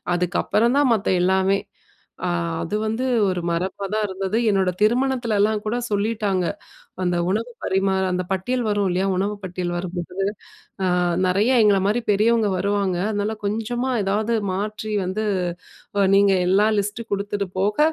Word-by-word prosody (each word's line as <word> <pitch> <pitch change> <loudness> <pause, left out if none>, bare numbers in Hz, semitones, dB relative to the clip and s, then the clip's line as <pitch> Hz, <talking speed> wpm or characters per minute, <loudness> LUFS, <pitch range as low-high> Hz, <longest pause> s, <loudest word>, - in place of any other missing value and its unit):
அதுக்கப்பறந்தான் 235 - +2
மத்த 210 -2 -1 0.2
எல்லாமே! 190 +1 +3 0.7
அ - - 0 0.3
அது 205 - -3
வந்து 225 +4 -1 0.2
ஒரு 180 -2 -1
மரபா 185 +3 -2
தான் 215 0 +1
இருந்தது. 190 +3 -2
என்னோட 190 -2 +2
திருமணத்துலல்லாம் 220 -3 +2
கூட 220 +3 -1
சொல்லிட்டாங்க, 205 -3 0 0.6
அந்த 175 -1 +1
உணவு 225 +4 -1
பரிமாற 190 0 +1
அந்த 180 0 -1
பட்டியல் 245 +7 -1
வரும் 205 -1 +1
இல்லயா! 185 +2 0
உணவு 200 +3 0
பட்டியல் 180 -1 -3
வரும்போது 180 0 -5 0.7
அ, - - +2 0.4
"நிறைய 200 +7 +2
எங்களமாரி 205 +2 +3
பெரியவுங்க 215 +1 +3
வருவாங்க. 200 -2 0
அதனால 210 +1 -1
கொஞ்சமா 235 +5 -1
ஏதாவது 215 +4 0 0.2
மாற்றி 210 +2 -3
வந்து 200 +4 -2 0.7
அ 195 - +4
நீங்க 200 0 +5 0.2
எல்லா 205 +3 +4
லிஸ்ட்டு 210 +3 -3
கொடுத்தது 200 -1 -2
போக 205 +5 0
200 Hz, 135 wpm, -22 LUFS, 190-220 Hz, 0.7 s, நீங்க